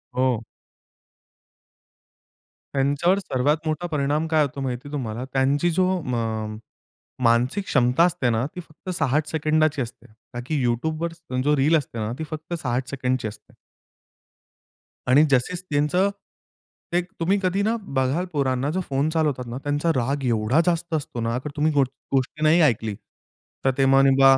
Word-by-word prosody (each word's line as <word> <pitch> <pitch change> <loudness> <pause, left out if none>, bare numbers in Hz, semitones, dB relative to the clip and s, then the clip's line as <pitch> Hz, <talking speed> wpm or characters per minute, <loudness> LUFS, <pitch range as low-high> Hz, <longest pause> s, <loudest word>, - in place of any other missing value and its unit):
हो. 125 -3 +1 2.3
त्यांच्यावर 145 +8 +2
सर्वात 145 -4 +1
मोठा 160 +3 -1
परिणाम 150 0 0
काय 160 -1 +3
होतो 140 -1 -4
माहिती 130 +1 -4
तुम्हाला 125 -4 -4
त्यांची 140 +5 +2
जो 185 +2 +2
अ, - - -7
म 110 -3 -2 0.7
मानसिक 120 - +2
क्षमता 125 +2 +3
असते 175 -8 +2
ना, 115 +1 +1
ती - - -5
फक्त 165 +2 -12
60 150 +1 +1
सेकंदाची 155 -1 +1
असते. 120 -1 -7 0.3
का 120 - -4
की 145 -1 -1
YouTubeवर 160 +8 -1 0.3
जो 150 +2 +3
रील 145 +5 +4
असते 140 -5 -5
ना 110 0 -2
ती - - -2
फक्त 155 +2 -6
60 125 -2 -2
सेकंदची 130 -3 -1
असते. 110 - -12 1.5
आणि 135 +4 +6
जसेच 135 +8 +1
त्यांचं 150 +7 +2 0.8
ते 175 - +3 0.2
तुम्ही 185 +5 +2
कधी 185 +2 +1
ना 220 +2 +1 0.2
बघाल 135 +7 +1
पोरांना 135 -1 0
जो 185 +3 -1
फोन 140 +2 +1
चालवतात 150 -6 0
ना, 120 +1 -5
त्यांचा 145 +3 0
राग 135 +3 0
एवढा 115 +5 +2
जास्त 170 -1 0
असतो 140 -5 -4
ना 115 0 -1
अगर 130 +4 -4
तुम्ही 155 +1 +2
गो 140 -1 +4 0.3
गोष्टी 135 +3 0
नाही 160 +3 +5
ऐकली. 110 -8 +2 0.7
तर 135 - +5
ते 135 - +4
मग 135 0 +5
नाही 135 0 +6
140 Hz, 155 wpm, -24 LUFS, 125-160 Hz, 2.3 s, आणि